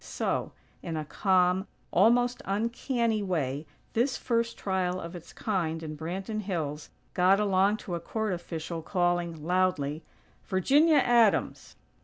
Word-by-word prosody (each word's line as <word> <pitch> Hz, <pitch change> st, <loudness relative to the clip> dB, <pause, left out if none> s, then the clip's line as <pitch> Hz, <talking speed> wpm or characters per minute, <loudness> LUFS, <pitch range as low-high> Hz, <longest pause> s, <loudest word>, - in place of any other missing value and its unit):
So, -, -, -2 dB, 0.3 s
in 165 Hz, -2 st, -4 dB
a 155 Hz, -, -3 dB
calm, 185 Hz, +2 st, +2 dB, 0.2 s
almost 245 Hz, +2 st, +3 dB
uncanny 230 Hz, +2 st, 0 dB
way, 150 Hz, -6 st, -2 dB, 0.3 s
this 250 Hz, +3 st, +1 dB
first 230 Hz, -1 st, -1 dB
trial 185 Hz, -2 st, -1 dB
of 170 Hz, +1 st, -7 dB
its 170 Hz, -, -10 dB
kind 165 Hz, -6 st, -2 dB
in 155 Hz, -1 st, -5 dB
Branton 190 Hz, +7 st, -4 dB
Hills 155 Hz, -7 st, -4 dB, 0.2 s
got 185 Hz, +2 st, +4 dB
along 200 Hz, 0 st, +3 dB
to 180 Hz, -, -5 dB
a 170 Hz, -, -1 dB
court 215 Hz, +4 st, -2 dB
official 165 Hz, -1 st, -5 dB
calling, 175 Hz, -2 st, -1 dB
loudly: 170 Hz, -5 st, +1 dB, 0.4 s
"Virginia 290 Hz, -, +3 dB
Adams!!" 235 Hz, -5 st, +2 dB
185 Hz, 130 wpm, -28 LUFS, 165-215 Hz, 0.4 s, got